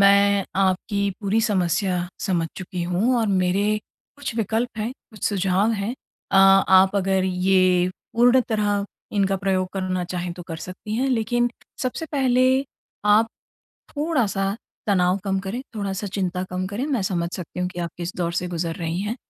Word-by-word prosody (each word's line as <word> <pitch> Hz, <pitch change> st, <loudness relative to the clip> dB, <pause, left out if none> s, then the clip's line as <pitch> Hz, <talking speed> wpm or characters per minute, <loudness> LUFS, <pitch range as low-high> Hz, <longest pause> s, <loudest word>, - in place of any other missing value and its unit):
मैं 200 Hz, 0 st, +5 dB
आपकी 195 Hz, +1 st, +1 dB
पूरी 210 Hz, +2 st, +1 dB
समस्या 180 Hz, -3 st, +1 dB, 0.2 s
समझ 175 Hz, -4 st, +1 dB
चुकी 180 Hz, -1 st, -5 dB
हूँ 185 Hz, +9 st, +1 dB
और 225 Hz, -, +1 dB
मेरे 195 Hz, +2 st, +2 dB, 0.4 s
कुछ 285 Hz, -4 st, -5 dB
विकल्प 225 Hz, +2 st, -1 dB
हैं, 215 Hz, +2 st, -1 dB, 0.2 s
कुछ 215 Hz, -, -8 dB
सुझाव 195 Hz, +1 st, +1 dB
हैं 210 Hz, +2 st, -2 dB, 0.4 s
अ, -, -, +4 dB
आप 195 Hz, 0 st, +6 dB
अगर 190 Hz, -1 st, +2 dB
ये 185 Hz, -1 st, +3 dB, 0.2 s
पूर्ण 245 Hz, +2 st, +5 dB
तरह 205 Hz, -2 st, +1 dB, 0.3 s
इनका 195 Hz, -1 st, +2 dB
प्रयोग 185 Hz, -1 st, 0 dB
करना 185 Hz, -2 st, -1 dB
चाहें 180 Hz, -1 st, -3 dB
तो 175 Hz, +1 st, -9 dB
कर 165 Hz, -, -4 dB
सकती 185 Hz, +5 st, -6 dB
हैं 265 Hz, +3 st, +1 dB
लेकिन 240 Hz, 0 st, +1 dB, 0.3 s
सबसे 260 Hz, +5 st, -2 dB
पहले 255 Hz, -3 st, +3 dB, 0.6 s
आप 210 Hz, +2 st, +5 dB, 0.6 s
थोड़ा-सा 230 Hz, -11 st, 0 dB, 0.3 s
तनाव 185 Hz, -2 st, +3 dB
कम 195 Hz, -1 st, 0 dB
करें, 195 Hz, +6 st, -4 dB
थोड़ा-सा 200 Hz, -1 st, -3 dB
चिंता 185 Hz, -2 st, -2 dB
कम 185 Hz, +1 st, -2 dB
करें, 205 Hz, +7 st, -3 dB
मैं 275 Hz, -7 st, 0 dB
समझ 175 Hz, -3 st, -1 dB
सकती 180 Hz, 0 st, -7 dB
हूँ 180 Hz, -, 0 dB
कि 180 Hz, -, -8 dB
आप 170 Hz, -1 st, -2 dB
किस 175 Hz, +1 st, -5 dB
दौर 170 Hz, -1 st, 0 dB
से 180 Hz, +1 st, -1 dB
गुजर 170 Hz, -1 st, -3 dB
रही 170 Hz, -1 st, -3 dB
हैं। 210 Hz, +3 st, -2 dB
195 Hz, 165 wpm, -23 LUFS, 180-215 Hz, 0.6 s, आप